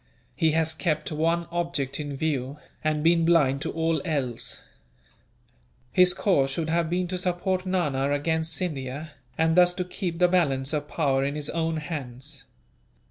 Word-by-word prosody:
He 160 Hz, -3 st, +2 dB
has 160 Hz, 0 st, +2 dB
kept 155 Hz, -2 st, -1 dB
one 165 Hz, +2 st, +1 dB
object 170 Hz, -6 st, -2 dB
in 145 Hz, -2 st, -4 dB
view, 140 Hz, -2 st, -1 dB, 0.3 s
and 155 Hz, -1 st, 0 dB
been 165 Hz, 0 st, +4 dB
blind 150 Hz, -5 st, +3 dB
to -, -, -2 dB
all 165 Hz, -2 st, 0 dB
else. 130 Hz, -7 st, -2 dB, 1.3 s
"His 180 Hz, 0 st, +4 dB
course 145 Hz, -10 st, +2 dB
should 160 Hz, +3 st, -2 dB
have 165 Hz, -1 st, +1 dB
been 180 Hz, +1 st, 0 dB
to 185 Hz, 0 st, -2 dB
support 185 Hz, +1 st, -1 dB
Nana 145 Hz, -7 st, 0 dB
against 160 Hz, +3 st, 0 dB
Scindia, 150 Hz, -3 st, -4 dB, 0.3 s
and 160 Hz, 0 st, +3 dB
thus 180 Hz, 0 st, +5 dB
to 180 Hz, -, -2 dB
keep 180 Hz, -2 st, -4 dB
the 180 Hz, +1 st, +5 dB
balance 145 Hz, -6 st, +1 dB
of 150 Hz, -1 st, -1 dB
power 135 Hz, -5 st, +1 dB
in 140 Hz, +1 st, -1 dB
his 150 Hz, -1 st, -4 dB
own 165 Hz, -1 st, -1 dB
hands. 140 Hz, -3 st, -6 dB
160 Hz, 160 wpm, -26 LUFS, 140-170 Hz, 1.3 s, thus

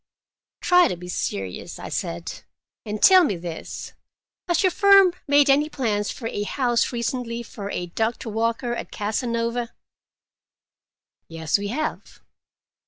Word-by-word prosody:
"Try 360 Hz, 0 st, +5 dB
to 180 Hz, -, -3 dB
be 180 Hz, +1 st, -10 dB
serious," 95 Hz, -, -4 dB
I -, -, -8 dB
said. 85 Hz, 0 st, -4 dB, 0.5 s
"And 210 Hz, 0 st, -4 dB
tell 375 Hz, -1 st, +8 dB
me 205 Hz, -, 0 dB
this: 170 Hz, -1 st, -7 dB, 0.5 s
has 345 Hz, 0 st, +2 dB
your 370 Hz, -, +4 dB
firm 395 Hz, -1 st, +6 dB
made 285 Hz, 0 st, +5 dB
any 290 Hz, +2 st, +3 dB
plans 215 Hz, -8 st, -1 dB
for 230 Hz, -, -5 dB
a 205 Hz, -, -3 dB
house 240 Hz, +2 st, 0 dB
recently, 235 Hz, -1 st, -3 dB
for 200 Hz, -3 st, -8 dB
a 180 Hz, -, -3 dB
Doctor 225 Hz, +6 st, -2 dB
Walker, 230 Hz, +2 st, -1 dB
at -, -, -5 dB
Casanova?" 230 Hz, +2 st, -2 dB, 1.5 s
"Yes, 165 Hz, +3 st, -1 dB
we 205 Hz, -, -3 dB
have." 295 Hz, +9 st, -4 dB
230 Hz, 135 wpm, -23 LUFS, 205-280 Hz, 1.5 s, tell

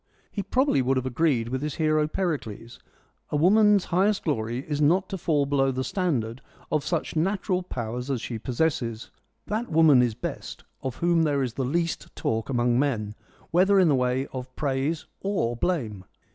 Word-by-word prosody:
He 205 Hz, -, -3 dB
probably 255 Hz, -, +2 dB
would 130 Hz, +1 st, +1 dB
have 130 Hz, -, -1 dB
agreed 130 Hz, -3 st, +1 dB
with 130 Hz, +1 st, -2 dB
his 150 Hz, -1 st, -3 dB
hero 155 Hz, -1 st, +2 dB
Pericles, 145 Hz, -, -4 dB, 0.3 s
' -, -, -43 dB
a -, -, 0 dB
woman's 205 Hz, +5 st, +5 dB
highest 195 Hz, +3 st, +2 dB
glory 120 Hz, -3 st, -2 dB
is 150 Hz, -1 st, -2 dB
not 180 Hz, +6 st, +3 dB
to 195 Hz, -, -3 dB
fall 150 Hz, -5 st, +1 dB
below 135 Hz, -1 st, +2 dB
the 130 Hz, 0 st, -2 dB
standard 130 Hz, -, -1 dB, 0.3 s
of 155 Hz, -2 st, +1 dB
such 170 Hz, -2 st, -2 dB
natural 185 Hz, +2 st, 0 dB
powers 125 Hz, -5 st, -5 dB
as 135 Hz, -3 st, 0 dB
she 115 Hz, 0 st, -5 dB
possesses: 120 Hz, -3 st, -2 dB, 0.3 s
that 220 Hz, +4 st, -3 dB
woman 155 Hz, -5 st, +6 dB
is 120 Hz, -3 st, +1 dB
best 120 Hz, -, -6 dB, 0.2 s
of 130 Hz, -2 st, -4 dB
whom 170 Hz, -1 st, +2 dB
there 145 Hz, -3 st, +1 dB
is 125 Hz, -3 st, -3 dB
the 135 Hz, -, -2 dB
least 165 Hz, +6 st, -2 dB
talk 110 Hz, +2 st, -2 dB
among 120 Hz, -1 st, +2 dB
men, 110 Hz, -7 st, 0 dB, 0.4 s
whether 195 Hz, +3 st, +4 dB
in 180 Hz, -3 st, +5 dB
the -, -, +4 dB
way 125 Hz, 0 st, +1 dB
of 130 Hz, 0 st, -7 dB
praise 140 Hz, +2 st, -1 dB, 0.2 s
or 190 Hz, -, 0 dB
blame.' 115 Hz, -, -2 dB
145 Hz, 180 wpm, -26 LUFS, 125-170 Hz, 0.4 s, woman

